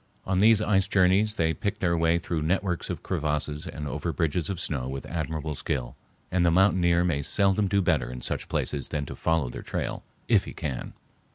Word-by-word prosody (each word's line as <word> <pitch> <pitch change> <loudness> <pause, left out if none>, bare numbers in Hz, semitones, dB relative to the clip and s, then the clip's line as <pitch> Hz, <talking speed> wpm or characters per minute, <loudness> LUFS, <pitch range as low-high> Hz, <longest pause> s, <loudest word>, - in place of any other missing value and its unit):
On 95 -1 +1
these 110 +1 +5
ice 95 -3 +2
journeys 100 +3 +3
they 80 -3 +1
pick 100 +6 -2
their 85 -2 +1
way 85 0 +3
through 85 -1 -2
networks 90 +2 -1
of - - -4
crevasses 75 0 -2
and 75 -1 -5
over 75 +4 -2
bridges 80 +2 -1
of 95 -4 -3
snow 70 -7 -2
with 65 0 -5
admirable 80 -2 -3
skill, 65 -3 -3 0.4
and 90 -1 +2
the 85 - +4
mountaineer 85 -1 +4
may 80 -5 0
seldom 100 +6 +2
do 100 0 +2
better 75 - +1
in 60 - -6
such - - -3
places 70 -3 -1
than 75 -1 -2
to - - -7
follow 80 -5 +1
their - - -6
trail, - - -3 0.3
if - - +4
he - - -7
can. 70 -5 -4
85 Hz, 200 wpm, -27 LUFS, 75-95 Hz, 0.4 s, these